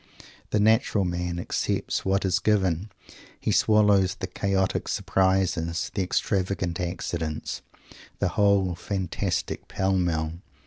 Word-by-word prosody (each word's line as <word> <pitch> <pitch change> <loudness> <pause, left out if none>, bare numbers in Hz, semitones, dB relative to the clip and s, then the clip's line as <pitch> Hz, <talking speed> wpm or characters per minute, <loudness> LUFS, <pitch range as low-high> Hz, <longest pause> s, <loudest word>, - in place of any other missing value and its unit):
The 105 - +1
natural 110 -2 +3
man 90 0 -2
accepts 85 - -1
what 95 +1 +1
is 95 -1 +2
given. 95 -1 +1 0.5
He - - -1
swallows 105 -3 +4
the - - -4
chaotic 95 -1 -1
surprises, 95 -3 +1
the 100 - -1
extravagant 95 -2 -1
accidents, 85 -3 -3 0.6
the - - +1
whole 100 -3 +3
fantastic 95 0 -3
"pell 95 0 0
mell." 85 -3 0
95 Hz, 115 wpm, -26 LUFS, 85-100 Hz, 0.6 s, swallows